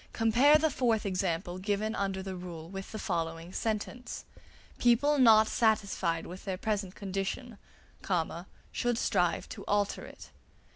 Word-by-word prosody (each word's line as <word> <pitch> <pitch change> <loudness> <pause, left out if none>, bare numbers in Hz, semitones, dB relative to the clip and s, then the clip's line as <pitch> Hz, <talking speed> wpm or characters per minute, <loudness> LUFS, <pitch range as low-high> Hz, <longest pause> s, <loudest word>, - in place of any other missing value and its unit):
Compare 245 +7 +5
the 315 0 +1
fourth 230 -6 +1
example 180 -2 -1
given 205 +3 -1
under 195 -2 -2
the 190 -1 -5
rule 175 -3 -7
with 195 +2 -7
the 220 - -5
following 165 -2 -3
sentence: 225 +3 -3 0.5
"People 275 +5 +4
not 220 -3 +7
satisfied 200 -8 +1
with 185 +2 -9
their 190 -2 -3
present 200 -2 -2
condition, 200 +4 -4 1.1
should 245 -2 0
strive 180 -7 +1
to 205 -3 -8
alter 205 0 0
it." - - -12
200 Hz, 135 wpm, -30 LUFS, 185-225 Hz, 1.1 s, not